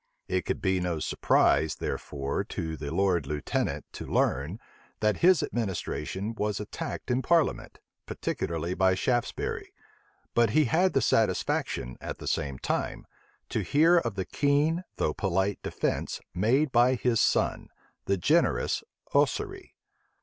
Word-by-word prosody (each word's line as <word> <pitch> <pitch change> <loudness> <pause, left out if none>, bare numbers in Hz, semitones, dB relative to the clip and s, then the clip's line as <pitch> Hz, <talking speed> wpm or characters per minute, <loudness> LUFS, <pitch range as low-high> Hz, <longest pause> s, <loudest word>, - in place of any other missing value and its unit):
It 95 0 -1
could - - -3
be 95 -1 +2
no 90 -2 -1
surprise, 80 0 +2
therefore, 70 -1 -3
to 80 -1 -4
the 75 -2 -6
lord 90 0 +1
lieutenant 75 -2 -2
to - - -7
learn, 75 - 0 0.4
that 105 -1 +2
his 180 0 +5
administration 100 -1 -3
was 105 -2 -2
attacked - - -5
in 125 +1 +2
parliament, 165 +2 +1 0.3
particularly 85 +1 -3
by 95 0 +3
Shaftesbury; 120 +5 -1 0.6
but 115 -2 +4
he 155 - +5
had 180 +9 +2
the 135 - +2
satisfaction, 95 - 0
at - - -5
the - - -9
same 70 -5 -1
time, - - -2 0.4
to - - -1
hear 165 +4 +4
of 120 -9 -3
the 95 -2 -2
keen 150 +5 +1
though 75 - 0
polite 95 +2 0
defence - - -2
made 130 +10 +2
by 125 +1 +4
his 120 -2 +1
son, - - +1 0.4
the 100 - +1
generous 150 - +2 0.3
Ossory. 390 -3 0
105 Hz, 135 wpm, -28 LUFS, 90-135 Hz, 0.6 s, his